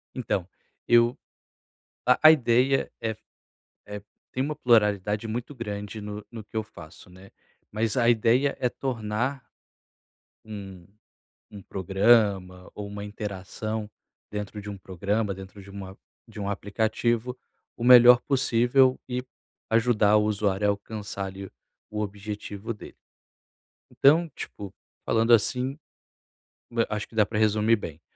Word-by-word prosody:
Então, 100 -7 -2 0.4
eu 120 0 +4 0.9
a - - +4
a 155 - +11
ideia 130 -1 +2
é 115 - -1
f - - -11 0.7
eh, 105 0 -7 0.3
tem 130 - -1
uma 150 +2 -2
pluralidade 105 -3 +2
muito 120 +6 -5
grande 105 -2 -6
no 105 0 -7
no 110 -3 -8
que 110 - -11
eu 110 - +1
faço, 85 -4 -14
né. 95 +2 -15 0.4
Mas 110 +1 -1
a 120 -2 +3
ideia 120 +4 +3
é 125 - +2
tornar 120 +1 -3 1.0
um 95 -5 -9 0.6
um 100 - -10
programa 95 -1 +2
ou 105 -1 -6
uma 100 0 -7
interação 105 +1 -5 0.4
dentro 105 0 -5
de 105 - -7
um 100 - -7
programa, 100 +3 -2
dentro 95 +1 -11
de 100 - -15
uma 95 -1 -9 0.3
de 110 -1 -13
um 100 - -3
aplicativo, 110 +4 -1 0.4
o - - -8
melhor 125 0 +9
possível, 130 -1 +3
e 125 0 -2 0.5
ajudar 110 -2 +3
o 105 - +3
usuário 105 -1 0
a - - +5
alcançar, 100 -1 -5
ali, 95 0 -8 0.4
o 105 - -4
objetivo 105 +1 -5
dele. 105 - -12 0.9
Então, 160 +4 +4
tipo, 100 -2 -8 0.3
falando 115 +1 +2
assim, 125 +5 +2 1.0
hã 115 -1 +1
acho 105 0 -3
que 115 - -18
dá 105 - +4
para 105 +1 -3
resumir 110 +1 +3
bem. 80 -5 -8
105 Hz, 135 wpm, -26 LUFS, 100-120 Hz, 1.0 s, a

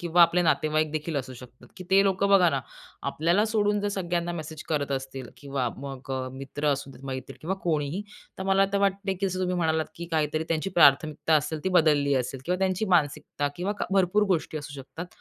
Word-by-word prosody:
किंवा 175 0 +4
आपले 170 +1 +4
नातेवाईकदेखील 155 -1 0
असू 130 -1 -4
शकतात, 125 0 -14
की 185 - -8
ते 195 +1 +6
लोक 195 0 +1
बघा 195 -3 +6
ना 135 -3 0 0.5
आपल्याला 170 +7 +2
सोडून 205 -1 +2
जर 205 - -1
सगळ्यांना 175 -3 -2
मेसेज 160 -2 -6
करत 145 -3 -1
असतील 130 -2 -5
किंवा 140 -3 -2
मग 135 -1 -8
अ, 130 -1 -2
मित्र 135 +3 -5
असू 140 0 -5
देत, 135 - -14
मैत्रीण 130 -1 -6
किंवा 180 +5 -2
कोणीही 160 +3 -1 0.4
तर - - -3
मला 195 0 +3
तर 200 - +2
वाटते, 195 0 0
की 195 +1 -1
जसं 185 0 -3
तुम्ही 180 0 0
म्हणालात, 160 -2 +1
की 170 - -6
काहीतरी 155 0 0
त्यांची 165 +4 -1
प्राथमिकता 155 -1 +4
असेल 155 +1 -2
ती - - +2
बदलली 150 -6 +3
असेल 130 0 -2
किंवा 180 +1 0
त्यांची 190 +2 0
मानसिकता 145 -3 +1
किंवा 185 +4 -1
क - - 0
भरपूर 195 +2 +3
गोष्टी 155 -1 -4
असू 145 -1 -8
शकतात. 135 +7 -8
160 Hz, 200 wpm, -27 LUFS, 140-185 Hz, 0.5 s, ते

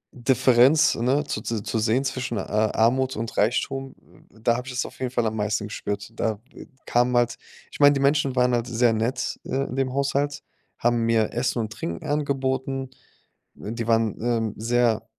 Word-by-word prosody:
Differenz, 130 +3 +4
ne, 130 +5 +1
zu 110 - -4
zu 110 -1 -3
zu 115 - -2
sehen 115 +4 +1
zwischen, 130 -3 -3
äh, - - -1
Armut 115 +6 +1
und 115 +1 -5
Reichtum, 135 +5 0
w - - -22
w 110 - -21
da 120 0 +3
habe 125 +1 -6
ich 130 - -6
das 125 - -1
auf - - -11
jeden 130 -1 -2
Fall 120 -2 0
am 110 0 -1
meisten 105 0 -1
gespürt. 100 0 -5
Da 110 -2 -1 0.5
kamen 120 +1 +2
halt 120 -1 +1 0.3
ich - - -11
meine, 145 0 +7
die 140 - -1
Menschen 140 -1 +2
waren 125 0 +3
halt 120 0 0
sehr 120 -1 +2
nett, 120 +4 -2
äh, 135 +1 -1
in 130 - -5
dem 135 -1 0
Haushalt, 140 +1 -1 0.3
haben 120 0 +1
mir 115 -2 +2
Essen 125 +1 -1
und 110 0 -5
Trinken 85 - -5
angeboten. 135 -2 -1 0.6
Die 115 +2 -5
waren, 115 -2 +1
ähm, 115 -3 0
sehr 115 0 +1
120 Hz, 190 wpm, -24 LUFS, 115-130 Hz, 0.6 s, meine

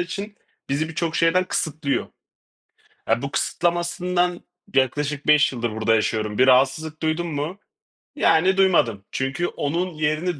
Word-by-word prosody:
için 200 +4 -5 0.3
bizi 150 +4 -1
birçok 160 +1 -2
şeyden 175 +2 +3
kısıtlıyor. 155 -5 -2 1.0
Eee, 120 - +2
bu 140 - -3
kısıtlamasından 175 +2 0 0.3
yaklaşık 145 +2 0
5 150 -2 +5
yıldır 120 -2 -2
burada 110 +1 +1
yaşıyorum. 110 -1 -1
Bir 130 - +5
rahatsızlık 135 +5 +2
duydum 160 +1 -1
mu? 150 +7 -3 0.6
Yani 185 - +3
duymadım. 125 - +3
Çünkü 135 +7 -2
onun 170 +5 -2
yerini 155 +2 -1
155 Hz, 125 wpm, -23 LUFS, 135-175 Hz, 1.0 s, 5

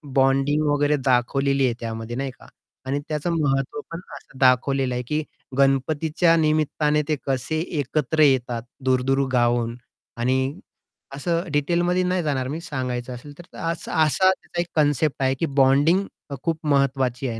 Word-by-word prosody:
Bonding 135 +3 +3
वगैरे 145 +1 +2
दाखवलेली 135 +2 +2
आहे 120 - +1
त्यामध्ये 115 0 -5
नाही 135 0 -3
का - - -15 0.4
आणि 140 +2 0
त्याचं 155 +3 -1
महत्त्व 135 0 0
पण 165 - -5 0.2
असं 135 - -14
दाखवलेलं 130 0 +3
आहे, 125 - -2
की 150 +5 -2 0.3
गणपतीच्या 150 +5 +2
निमित्ताने 155 -1 +1
ते 155 - +1
कसे 135 +4 -1 0.2
एकत्र 150 +2 0
येतात 125 -4 +2 0.2
दूर-दूर 130 +1 +2 0.2
गावावरून 120 -1 +1 0.4
आणि 130 +5 0 0.6
असं 170 +4 -1
डिटेलमध्ये 175 +5 +1
नाही 180 -1 0
जाणार 135 -4 -1
मी 155 +4 -4
सांगायचं 125 -5 -4
असेल 145 +4 -10
तर. - - -9
तर - - -11
असा 170 - -6
असा 185 +5 +3
त्याचा 175 -2 -4
एक - - -3
कन्सेप्ट 145 -1 +1
आहे 130 0 +2
की 165 - +1
बॉन्डिंग 145 +9 +4 0.2
अ, 140 - -4
खूप 165 -1 -1
महत्वाची 135 -2 +1
आहे 115 -1 -5
140 Hz, 155 wpm, -23 LUFS, 130-155 Hz, 0.6 s, बॉन्डिंग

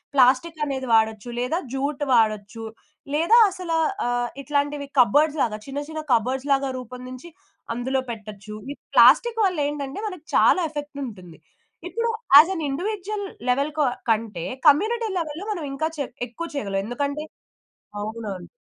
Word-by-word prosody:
Plastic 270 +5 +3
అనేది 265 -2 -3
వాడొచ్చు, 220 0 +2
లేదా 260 +8 0 0.2
జూట్ 285 +2 -2
వాడచ్చు, 220 -1 +1 0.5
లేదా 340 +10 +5
అసలా 350 -3 -3 0.3
ఆహ్, 245 0 0
ఇట్లాంటివి 285 0 -1
కబర్డ్స్‌లాగా 275 -2 +2
చిన్న 275 +1 -4
చిన్న 315 0 -4
కబర్డ్స్‌లాగా 265 +3 0
రూపొందించి, 255 +5 -9 0.5
అందులో 260 +2 -1
పెట్టచ్చు. 210 -1 -9 0.2
ఈ - - -6 0.2
ప్లాస్టిక్ 475 -1 +6
వల్లేంటంటే, 290 -3 -2
మనకి 360 -5 -11
చాలా 370 - +5
ఎఫెక్టుంటుంది. 270 - -7 0.5
ఇప్పుడు 465 +4 -1 0.3
యాస్ 310 +5 +10
ఎన్ 330 -4 -3
ఇండివిడ్యుయల్, 405 +6 -3 0.2
లెవెల్‌ 280 +4 +1
కొ 300 - +3 0.3
కంటే 215 -6 0 0.2
కమ్యూనిటీ 440 +10 +4
లెవెల్‌లో 325 +3 -4
మనం 345 -7 -3
ఇంకా 315 +3 -1
చే 285 - 0 0.2
ఎక్కువ 335 +9 -6
చెయగలం. 200 -7 -2
ఎందుకంటే 285 +5 -2 0.8
అవునవును. 210 -3 -5
280 Hz, 125 wpm, -24 LUFS, 230-315 Hz, 0.8 s, యాస్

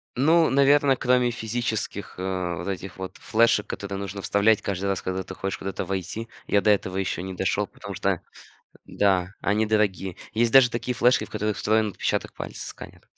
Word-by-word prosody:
Ну, 160 +5 +4
наверно, 140 0 +4
кроме 125 -1 +2
физических, 110 -3 -3
а, 90 -2 -2
вот 90 - -6
этих 95 -2 -5
вот 95 0 -6
флешек, 115 -2 +2
которые 100 0 -5
нужно 100 0 -5
вставлять 100 +2 +3
каждый 100 -1 -3
раз, 95 -2 0
когда 95 0 -3
ты 95 - -8
хочешь 95 +1 -3
куда-то 95 0 -4
войти, 95 +4 -4 0.2
я 100 - +3
до 105 - +4
этого 95 -2 0
еще 95 -2 -1
не 95 +1 -5
дошел, - - 0
потому - - -9
что - - 0 0.6
да, 95 -2 +1
они 105 +2 +1
дорогие. 100 -4 0 0.2
Есть 115 +1 +2
даже 130 -1 +7
такие 125 +1 -2
флешки, 125 +2 +3
в - - -18
которых 105 0 -2
встроен 110 0 +2
отпечаток 100 - -2
пальца, - - -7
сканер. - - -11
100 Hz, 180 wpm, -25 LUFS, 95-115 Hz, 0.6 s, даже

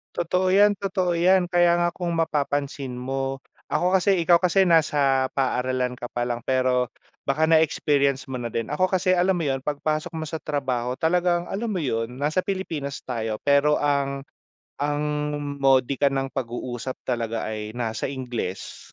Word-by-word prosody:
Totoo 180 +2 0
yan, 205 +1 +6
totoo 185 -2 0
yan, 180 +1 +4
kaya 175 -1 +4
nga 175 0 +2
kung 175 -2 -3
mapapansin 145 -4 -1
mo, 135 +1 -3 0.2
ako 180 +2 +2
kasi, 195 +1 +3
ikaw 170 0 +5
kasi, 190 +1 +3
nasa 145 -6 +3
paaralan 130 -1 0
ka 120 - -5
pa 120 0 -3
lang 120 -1 -2
pero 130 -1 +2 0.4
baka 150 +3 +1
na-experience 145 -4 +2
mo 125 - -3
na 120 - -3
din. 115 +3 -4
Ako 185 +5 +2
kasi 185 -1 +1
alam 185 +1 +3
mo 170 - -2
yun, 135 -2 0
'pag 145 +1 -4
pasok 155 +1 -1
mo 160 - -3
sa 160 +1 -5
trabaho 130 -4 -2
talagang, 175 +2 +1
alam 220 +4 -2
mo 190 -6 -2
yun 115 -3 -1
nasa 150 +6 0
Pilipinas 165 -8 -4
tayo, 115 -3 -3
pero 145 +1 +4
ang 140 -1 0 0.6
ang 145 +1 0 0.6
modika 135 +1 +3
ng 135 0 -2
pag-uusap 120 0 -4
talaga 115 -2 -2
ay 110 +1 -6
nasa 115 -1 -2
Ingles. 125 -8 -5
140 Hz, 160 wpm, -24 LUFS, 130-170 Hz, 0.6 s, yan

